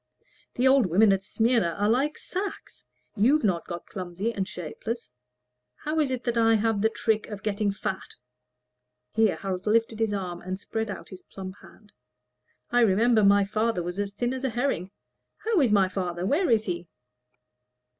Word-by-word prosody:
"The 250 Hz, +2 st, +3 dB
old 260 Hz, -5 st, +5 dB
women 195 Hz, +4 st, +5 dB
at 195 Hz, -, 0 dB
Smyrna 225 Hz, -3 st, +1 dB
are 205 Hz, -, +1 dB
like 270 Hz, +7 st, +1 dB
sacks. 390 Hz, +2 st, -6 dB, 0.3 s
You've 255 Hz, +8 st, +3 dB
not 180 Hz, -5 st, 0 dB
got 175 Hz, -1 st, -6 dB
clumsy 185 Hz, +4 st, -4 dB
and 195 Hz, -3 st, -2 dB
shapeless. 190 Hz, -, -6 dB, 0.6 s
How 310 Hz, +1 st, -2 dB
is 295 Hz, -3 st, +2 dB
it 255 Hz, -1 st, -4 dB
I 225 Hz, -1 st, +4 dB
have 220 Hz, -1 st, +1 dB
the 220 Hz, -, +4 dB
trick 220 Hz, -1 st, 0 dB
of 205 Hz, -2 st, -8 dB
getting 210 Hz, -1 st, 0 dB
fat?" 200 Hz, -1 st, -4 dB, 1.0 s
(Here 220 Hz, -2 st, +3 dB
Harold 190 Hz, 0 st, -4 dB
lifted 225 Hz, 0 st, +2 dB
his 225 Hz, -2 st, +1 dB
arm 180 Hz, -4 st, -4 dB
and 185 Hz, +1 st, -5 dB
spread 220 Hz, +1 st, -3 dB
out 205 Hz, -, -7 dB
his 185 Hz, -1 st, -10 dB
plump 190 Hz, 0 st, -9 dB
hand.) 210 Hz, -2 st, -18 dB, 0.8 s
"I 245 Hz, -, +4 dB
remember 225 Hz, +1 st, +4 dB
my 200 Hz, 0 st, +5 dB
father 215 Hz, -2 st, 0 dB
was 175 Hz, +3 st, -5 dB
as 200 Hz, 0 st, -3 dB
thin 240 Hz, +4 st, -1 dB
as 260 Hz, 0 st, -5 dB
a 265 Hz, -, +1 dB
herring. 240 Hz, -7 st, -1 dB, 0.6 s
How 445 Hz, -4 st, +3 dB
is 250 Hz, -6 st, +3 dB
my 200 Hz, -2 st, +4 dB
father? 180 Hz, -2 st, -3 dB
Where 300 Hz, -, +2 dB
is 220 Hz, -2 st, +3 dB
he?" 175 Hz, -2 st, -4 dB
210 Hz, 175 wpm, -26 LUFS, 190-235 Hz, 1.0 s, old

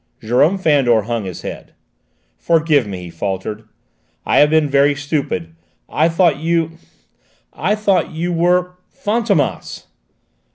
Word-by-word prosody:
Jérôme 135 Hz, -, +2 dB
Fandor 135 Hz, -, +3 dB
hung 115 Hz, -1 st, -3 dB
his 90 Hz, -2 st, -7 dB
head. -, -, -8 dB, 0.6 s
"Forgive 155 Hz, -7 st, +2 dB
me," 95 Hz, -3 st, -6 dB
he 90 Hz, -, -8 dB
faltered; 100 Hz, +5 st, -4 dB, 0.6 s
"I -, -, +3 dB
have 150 Hz, -, +5 dB
been 155 Hz, -1 st, +3 dB
very 140 Hz, +1 st, +3 dB
stupid. 140 Hz, -, -3 dB, 0.3 s
I 160 Hz, +2 st, +1 dB
thought 165 Hz, -4 st, +2 dB
you 165 Hz, 0 st, -1 dB, 0.7 s
I 200 Hz, +6 st, 0 dB
thought 205 Hz, -3 st, +1 dB
you 170 Hz, +2 st, -3 dB
were 180 Hz, +1 st, +1 dB
Fantômas!" 225 Hz, +2 st, -1 dB
150 Hz, 125 wpm, -18 LUFS, 120-170 Hz, 0.7 s, have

